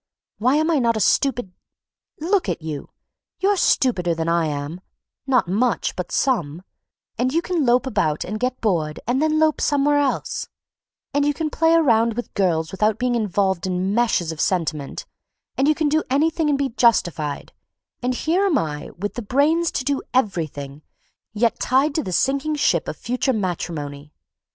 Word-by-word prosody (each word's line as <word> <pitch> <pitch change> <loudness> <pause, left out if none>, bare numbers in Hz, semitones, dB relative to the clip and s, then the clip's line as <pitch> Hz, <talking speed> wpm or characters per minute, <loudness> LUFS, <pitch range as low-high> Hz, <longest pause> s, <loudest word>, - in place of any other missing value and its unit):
Why 250 +5 +3
am 315 +2 +2
I 310 - +3
not 230 -2 +2
a - - -1
stupid—? 245 0 +1 0.7
Look 365 +5 +1
at - - -3
you; 150 -3 -5 0.5
you're 400 +2 +2
stupider 190 - +2
than 165 0 -2
I 170 -1 +2
am, 145 +4 -4 0.5
not 255 -7 +3
much, 225 +7 0
but 180 - -5
some, 175 - 0 0.6
and 255 +1 +1
you 325 - +2
can 340 -8 0
lope 245 +3 +3
about 155 - 0
and 215 +3 -5
get 255 +1 -1
bored 165 -8 0
and 250 +4 0
then 310 0 +2
lope 310 -1 +2
somewhere 290 0 +2
else, 280 -2 -1 0.7
and 285 - +2
you 290 0 +1
can 310 -1 -2
play 325 0 +3
around 230 -8 +3
with 240 - -5
girls 165 -5 0
without 210 +2 +1
being 250 0 0
involved 195 -4 0
in 185 +2 -1
meshes 220 -8 +1
of 160 - -5
sentiment, 165 - -2 0.5
and 270 - +2
you 310 - +4
can 310 -1 0
do 310 +2 +2
anything 315 +3 +1
and 285 - +2
be 275 -1 0
justified—and 225 - -1
here 340 +9 +1
am 330 -7 +2
I 150 - -3
with 205 +3 -3
the 240 - -5
brains 300 +9 +2
to - - -1
do 280 +1 0
everything, 155 - -1 0.5
yet 225 +2 0
tied 270 +4 +2
to 315 - 0
the 185 - -5
sinking 275 - +1
ship 175 - +1
of 155 - -5
future 255 - -1
matrimony. 155 -7 -4
235 Hz, 175 wpm, -22 LUFS, 175-285 Hz, 0.7 s, you